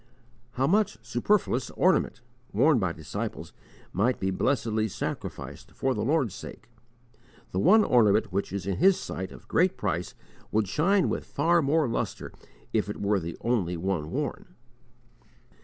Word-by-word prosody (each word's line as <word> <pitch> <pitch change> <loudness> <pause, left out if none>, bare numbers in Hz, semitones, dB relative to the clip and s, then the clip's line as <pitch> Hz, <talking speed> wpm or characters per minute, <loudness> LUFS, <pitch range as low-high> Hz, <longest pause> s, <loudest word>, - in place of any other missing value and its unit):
How 130 - +1
much 205 +6 +2
superfluous 125 - +1
ornament, 180 -9 +2 0.3
worn 135 +6 +4
by 95 -4 0
disciples, 80 -2 -6 0.4
might 115 +7 +1
be 95 0 0
blessedly 110 0 0
sacrificed 100 - -6
for 135 0 0
the 105 - -3
Lord's 135 - +1
sake! 100 - -10 0.8
The 95 - -1
one 210 - +6
ornament 110 - +3
which 100 +2 -2
is 100 -3 -4
in 100 -1 -1
His 190 +2 +4
sight 95 0 -5
of - - -13
great 180 +2 +2
price 90 -3 -2 0.4
would 110 -1 +1
shine 180 - +2
with - - -2
far 170 +4 +2
more 150 +1 +2
lustre 115 - -3 0.4
if - - +1
it - - -5
were 100 0 +1
the 85 -1 -6
only 95 -8 0
one 85 -3 -2
worn. 150 - -4
115 Hz, 150 wpm, -27 LUFS, 95-155 Hz, 0.8 s, one